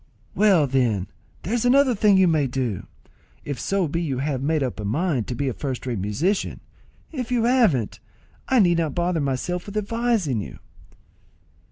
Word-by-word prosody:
"Well, 195 Hz, -7 st, +4 dB
then, 120 Hz, -8 st, 0 dB, 0.3 s
there's 225 Hz, +5 st, -1 dB
another 260 Hz, +1 st, +4 dB
thing 205 Hz, -2 st, +4 dB
you 190 Hz, -1 st, +5 dB
may 155 Hz, -4 st, +2 dB
do, 125 Hz, -6 st, -3 dB, 0.6 s
if 140 Hz, -5 st, -4 dB
so 195 Hz, +3 st, 0 dB
be 165 Hz, +4 st, -2 dB
you 140 Hz, -6 st, -2 dB
have 135 Hz, -1 st, -2 dB
made 155 Hz, +1 st, +1 dB
up 125 Hz, -4 st, -4 dB
a -, -, -4 dB
mind 130 Hz, -, -1 dB
to 125 Hz, -, -3 dB
be 140 Hz, +3 st, -2 dB
a 130 Hz, -, -1 dB
first 130 Hz, -2 st, -5 dB
rate 120 Hz, -5 st, -2 dB
musician; 145 Hz, -, -1 dB, 0.5 s
if 255 Hz, -6 st, -5 dB
you 240 Hz, -2 st, +2 dB
haven't, 230 Hz, -, +2 dB, 0.5 s
I 260 Hz, -, +3 dB
need 175 Hz, -3 st, +3 dB
not 160 Hz, -4 st, -1 dB
bother 175 Hz, -2 st, 0 dB
myself 145 Hz, +7 st, -2 dB
with 205 Hz, +1 st, -5 dB
advising 210 Hz, -, 0 dB
you." -, -, -8 dB
160 Hz, 175 wpm, -23 LUFS, 130-205 Hz, 0.6 s, you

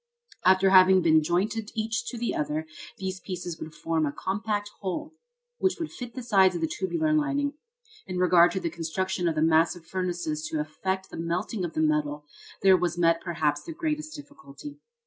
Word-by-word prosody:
After 190 Hz, +1 st, +5 dB
having 185 Hz, -1 st, +7 dB
been 160 Hz, -1 st, +5 dB
jointed 205 Hz, +7 st, -1 dB
each 225 Hz, +2 st, -1 dB
to 245 Hz, -, -5 dB
the 235 Hz, +1 st, -1 dB
other, 150 Hz, +1 st, -2 dB, 0.3 s
these 190 Hz, 0 st, -4 dB
pieces 180 Hz, -3 st, -6 dB
would 155 Hz, -, -8 dB
form 160 Hz, -2 st, 0 dB
a -, -, -2 dB
compact 205 Hz, +5 st, -3 dB
whole, 200 Hz, -, -4 dB, 0.5 s
which 380 Hz, -1 st, +2 dB
would 330 Hz, -, -4 dB
fit 245 Hz, -1 st, -8 dB
the 255 Hz, -, -5 dB
sides 195 Hz, -5 st, +4 dB
of -, -, -3 dB
the 325 Hz, -, +1 dB
tubular 330 Hz, -2 st, -1 dB
lining. 285 Hz, -1 st, +1 dB, 0.5 s
In 185 Hz, -, -4 dB
regard 180 Hz, -1 st, +6 dB
to 190 Hz, -, -1 dB
the 170 Hz, -, -3 dB
construction 175 Hz, +2 st, -2 dB
of 165 Hz, -, 0 dB
the 155 Hz, -, +2 dB
massive 165 Hz, +1 st, +2 dB
furnaces 175 Hz, -4 st, -3 dB
to 155 Hz, -, -2 dB
effect 190 Hz, +5 st, -3 dB
the -, -, -7 dB
melting 180 Hz, +5 st, -2 dB
of 170 Hz, -2 st, -3 dB
the 155 Hz, -, 0 dB
metal, 150 Hz, -1 st, 0 dB, 0.4 s
there 190 Hz, -1 st, +7 dB
was 175 Hz, -1 st, -1 dB
met 165 Hz, -1 st, +3 dB
perhaps 155 Hz, -4 st, -1 dB
the 330 Hz, -, -8 dB
greatest 310 Hz, -2 st, -3 dB
difficulty. 290 Hz, -, -11 dB
185 Hz, 185 wpm, -27 LUFS, 165-225 Hz, 0.5 s, having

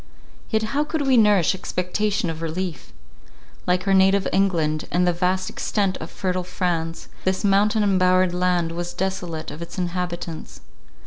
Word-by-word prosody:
Yet 220 Hz, -1 st, +1 dB
how 290 Hz, +1 st, +2 dB
could 300 Hz, 0 st, -2 dB
we 265 Hz, -1 st, +4 dB
nourish 210 Hz, -6 st, +4 dB
expectation 190 Hz, 0 st, -1 dB
of 160 Hz, 0 st, -8 dB
relief? 165 Hz, -1 st, -4 dB, 0.8 s
Like 180 Hz, +2 st, +1 dB
our 195 Hz, -, +4 dB
native 195 Hz, +1 st, +4 dB
England, 165 Hz, -6 st, +1 dB
and 180 Hz, +1 st, +2 dB
the 175 Hz, -, +2 dB
vast 185 Hz, +2 st, 0 dB
extent 195 Hz, -3 st, -1 dB
of 160 Hz, -, -7 dB
fertile 185 Hz, -1 st, -2 dB
France, 175 Hz, -2 st, -2 dB, 0.2 s
this 190 Hz, 0 st, 0 dB
mountain 210 Hz, +2 st, +3 dB
embowered 185 Hz, -2 st, +3 dB
land 180 Hz, -2 st, +1 dB
was 175 Hz, +1 st, -5 dB
desolate 180 Hz, -3 st, -3 dB
of 155 Hz, -, -9 dB
its 170 Hz, +2 st, -8 dB
inhabitants. 175 Hz, -2 st, -4 dB
180 Hz, 150 wpm, -23 LUFS, 175-195 Hz, 0.8 s, we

